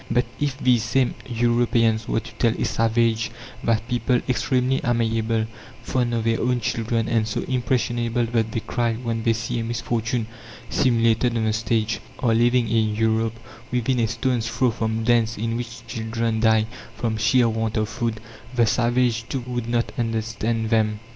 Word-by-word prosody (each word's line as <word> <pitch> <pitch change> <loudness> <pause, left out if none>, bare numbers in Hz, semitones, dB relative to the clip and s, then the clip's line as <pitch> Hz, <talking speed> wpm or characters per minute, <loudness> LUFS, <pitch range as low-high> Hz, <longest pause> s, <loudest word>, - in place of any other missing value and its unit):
But 125 +2 +2
if 145 -2 -1
these 125 -3 +3
same 120 +3 +1 0.2
Europeans 115 -2 +2
were 115 - 0
to - - -11
tell 115 -2 +3
a - - +1
savage 115 0 +1 0.3
that 115 -1 +1
people, 125 0 +1
extremely 130 0 +1
amiable, 115 -2 +1 0.4
fond 120 -2 0
of 115 - -1
their 115 0 +1
own 125 0 +1
children, 115 0 -1
and 115 -2 +1
so 105 - -2
impressionable 120 -2 0
that 115 -1 0
they 115 - -2
cry 120 -1 -1
when 115 -1 -3
they 115 0 +2
see 115 +2 -3
a - - -2
misfortune 115 0 -1 0.5
simulated 115 -1 +2
on 110 - 0
the 110 -1 +1
stage, 110 0 0 0.2
are 120 -5 +2
living 120 +1 +3
in 110 -1 +1
Europe 110 +1 +1 0.3
within 125 +1 +1
a 115 - +2
stone's 115 +1 -1
throw 115 +2 +1
from 110 0 -2
dens 115 -1 +2
in 115 +2 -2
which 115 -1 -6
children 115 0 -2
die 110 -1 +4 0.3
from 110 0 -1
sheer 115 +3 +4
want 110 0 -1
of 110 0 +1
food, 115 -1 -2 0.4
the 120 -1 +4
savage, 120 0 +1
too, 135 - -2
would 120 -2 -3
not 120 -1 0
understand 115 0 -1
them. 110 -2 +2
115 Hz, 170 wpm, -23 LUFS, 110-120 Hz, 0.5 s, die